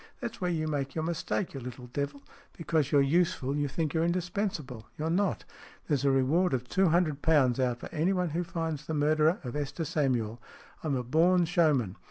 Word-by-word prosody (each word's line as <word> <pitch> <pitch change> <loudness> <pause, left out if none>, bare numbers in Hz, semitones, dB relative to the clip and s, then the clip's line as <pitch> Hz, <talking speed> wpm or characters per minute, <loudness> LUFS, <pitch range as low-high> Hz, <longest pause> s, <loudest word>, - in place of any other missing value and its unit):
" - - -36
That's 230 -3 -6
where 180 - 0
you 160 -2 -1
make 140 -3 -2
your 160 - -1
mistake, 170 +3 -2
you 135 - -5
little 125 0 -8
devil! 140 +3 -4 0.3
Because 160 -4 0
you're 145 - +5
useful, 140 -3 +1
you 145 0 0
think 155 +1 -2
you're 160 - +1
indispensable. 170 - -2
You're 160 +2 -1
not. 195 +2 0 0.4
There's 145 -4 +1
a - - +5
reward 135 +6 +2
of 125 -1 -4
two 190 +8 +2
hundred 155 -4 +1
pounds 135 -6 +3
out 125 -2 +1
for - - -8
anyone 180 +2 +1
who 170 +3 -1
finds 165 -4 -4
the 160 - -2
murderer 155 +3 +3
of 125 0 -5
Esther 150 +3 -3
Samuel. 120 -7 -1 0.4
I'm 150 -4 0
a 125 - -1
born 170 +7 +3
showman. 150 - +2
155 Hz, 200 wpm, -29 LUFS, 135-170 Hz, 0.4 s, you're